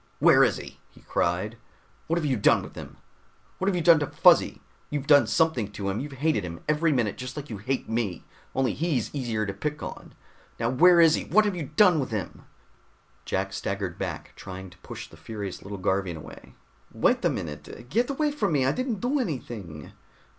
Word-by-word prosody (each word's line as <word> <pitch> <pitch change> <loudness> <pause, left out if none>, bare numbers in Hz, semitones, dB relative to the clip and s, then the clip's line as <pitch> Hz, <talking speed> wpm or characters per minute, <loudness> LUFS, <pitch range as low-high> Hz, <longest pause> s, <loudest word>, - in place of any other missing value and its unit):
"Where - - +6
is - - +2
he?" - - -10
he - - -20
cried. 95 +7 -1 0.5
"What 165 - +1
have 165 - -1
you 135 -3 +1
done 105 - +4
with - - -10
him? - - -10 0.6
What 190 - -1
have 200 - +2
you 175 - -1
done 170 -2 +7
to 145 - -1
Fuzzy? - - +4 0.3
You've 145 -2 -3
done 145 -1 +6
something 145 - +1
to 100 -1 -3
him! 95 - -2
You've 140 +1 -6
hated 140 -5 0
him 85 -1 -7
every 155 +2 +2
minute 120 -7 0
just 130 +2 -6
like 145 -3 -6
you 105 - -5
hate 130 +5 -2
me, 110 -6 -2 0.3
only 130 -5 +1
he's 160 -3 -1
easier 115 -6 -1
to 100 - -4
pick 150 +9 -4
on. - - -8 0.4
Now 115 +1 0
where 175 +6 +6
is 165 -2 +7
he? - - -1
What 215 +4 +4
have 205 -3 0
you 155 -6 -5
done 180 -5 +6
to 135 - 0
him?" 105 -7 -5 0.8
Jack - - -2
staggered - - -3
back, - - -5
trying 95 -1 -9
to 90 - -18
push - - -8
the - - -16
furious 105 -4 -6
little 100 +1 -7
Garvian 95 -2 -1
away. 75 - -12 0.4
"Wait - - +2
a - - +4
minute! 80 +9 -6
Get 240 - +1
away 295 +2 0
from 210 - -1
me! 135 -3 +2
I 135 - +3
didn't 245 - -2
do 265 +4 +1
anything!" 115 - -5
130 Hz, 205 wpm, -26 LUFS, 100-165 Hz, 0.8 s, done